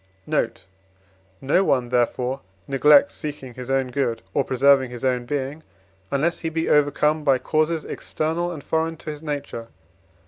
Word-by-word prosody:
Note. - - -1 0.8
No 145 +8 +3
one, 130 -8 +1
therefore, 125 +2 0 0.3
neglects 140 +1 +5
seeking 145 -4 -6
his 125 +1 -8
own 135 -1 +1
good, 120 -4 -1
or 140 - +2
preserving 135 0 +4
his 125 +1 -6
own 125 -2 +1
being, 145 +2 -3 0.5
unless 155 +5 0
he 165 - -2
be 160 0 -2
overcome 150 +1 +3
by 135 -3 +4
causes 155 +3 0
external 165 +3 -2
and 155 -5 -7
foreign 160 0 -1
to 155 - -6
his 150 -1 -9
nature. 145 -6 -5
140 Hz, 150 wpm, -23 LUFS, 130-155 Hz, 0.8 s, neglects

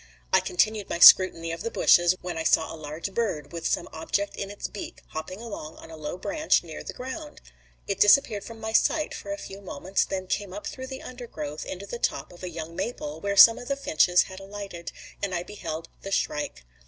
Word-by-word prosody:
I - - +7
continued 210 +2 0
my - - -1
scrutiny 170 -2 +8
of 165 - -5
the 230 - -2
bushes, 175 -5 +5
when 180 -1 -4
I 160 - -2
saw 160 - +2
a - - -6
large 155 +5 -6
bird, 190 -10 -2
with 165 -1 -2
some - - -1
object 200 +5 -2
in 200 - -4
its 205 - -5
beak, 205 - -8
hopping 185 +5 -6
along 205 -9 -7
on 165 - -12
a - - -8
low 155 +2 -5
branch 305 - +1
near 160 -2 -8
the - - -6
ground. 280 +4 -7 0.5
It 195 -1 -2
disappeared 210 0 +5
from 230 -1 -10
my 220 0 -4
sight 300 +5 +2
for 300 - -7
a 300 - -3
few 195 -8 -9
moments, 190 +1 -1
then 190 -1 -4
came 185 0 -3
up 205 - -7
through 260 0 -6
the 265 0 -7
undergrowth 155 - -7
into 190 +2 -6
the 235 +4 -6
top - - -2
of 175 - -15
a 180 - -4
young 165 0 -7
maple 165 -6 -4
where 200 0 -2
some 230 +3 +9
of 245 - -9
the 275 - 0
finches 180 - +3
had 190 0 -10
alighted, 195 -3 -7 0.3
and 195 -3 -1
I 170 - -2
beheld 165 -5 -6
the 195 - -6
shrike. 145 - -2
190 Hz, 220 wpm, -26 LUFS, 165-215 Hz, 0.5 s, some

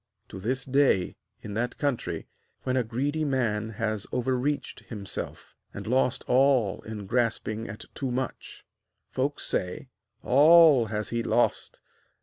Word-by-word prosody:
To - - -8
this 125 +6 -2
day, 135 -9 +2 0.3
in 105 - -6
that 120 +3 -2
country, 140 -4 -2 0.4
when 130 -1 0
a 130 - +2
greedy 140 +7 -1
man 115 -6 0
has 110 -1 -3
overreached 130 +3 -1
himself, 100 -4 -6 0.2
and - - -6
lost 125 +1 +1
all 130 -6 +3
in 110 -2 -7
grasping 115 -1 -1
at 105 - -8
too 135 - -3
much, 130 +1 -5 0.5
folks 140 +3 -1
say: 90 +8 -3 0.3
'All 150 -2 +7
has 105 0 -3
he 120 0 -1
lost! 120 +1 0
125 Hz, 135 wpm, -27 LUFS, 110-135 Hz, 0.5 s, All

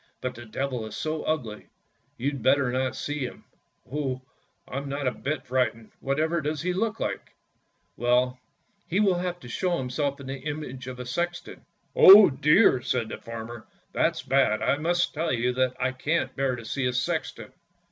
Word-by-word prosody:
But 125 - -3
the 120 +1 -10
Devil 125 0 -3
is 105 - -8
so 155 0 -2
ugly, 125 -9 -3 0.5
you'd 140 +1 -2
better 130 +1 +3
not 130 +1 -1
see 145 0 -4
him." 130 -3 -5 0.5
"Oh! 135 -3 -2 0.4
I'm 140 +2 -5
not 140 +1 -3
a 130 - +2
bit 140 +3 -4
frightened. 125 -3 -1
Whatever 155 +5 0
does 150 +1 -2
he 180 0 0
look 220 +3 -1
like? - - -4 0.2
" - - -45
" - - -45
Well, 125 +1 +2 0.5
he 185 +2 0
will 190 -4 +3 0.2
show 175 +9 -1
himself 140 +2 -2
in 140 - -9
the 135 0 -5
image 135 -3 -6
of 125 -1 -7
a 125 - -5
sexton." 175 +7 -4 0.3
"Oh, 195 -2 +10
dear!" 150 - +4
said 120 -3 -1
the - - -6
farmer; 115 0 -8 0.3
"that's - - +1
bad! 130 -5 +2
I 140 - +2
must 175 +3 0
tell 160 +2 -1
you 125 0 +1
that 130 0 +1
I 130 +1 +1
can't 130 0 -1
bear 135 -2 0
to 115 -2 -9
see 130 +3 -1
a 125 - -1
sexton! 125 +1 -3
135 Hz, 180 wpm, -26 LUFS, 125-155 Hz, 0.5 s, Oh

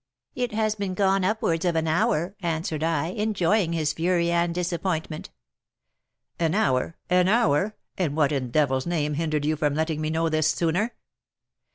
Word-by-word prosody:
'It 245 -1 -2
has 215 0 +1
been 200 -3 -4
gone 195 0 +2
upwards 185 -4 0
of 175 -2 +1
an 160 0 0
hour,' 180 +1 +1
answered 160 -2 -2
I, 160 -1 0
enjoying 205 -2 +1
his 155 -2 0
fury 170 +1 +1
and 170 0 +1
disappointment. 170 -2 -3 1.1
'An 165 +1 +1
hour! 135 -5 +1
an 180 0 +4
hour! 215 -2 +2 0.2
and 155 -5 0
what, 150 -2 +3
in 135 -3 -1
the - - -7
devil's 135 0 +1
name, 150 -4 0
hindered 155 -1 -1
you 155 +1 +1
from 150 -2 0
letting 160 0 -1
me 155 - -1
know 165 +1 0
this 155 -1 +2
sooner?' 180 +8 0
165 Hz, 170 wpm, -25 LUFS, 155-185 Hz, 1.1 s, an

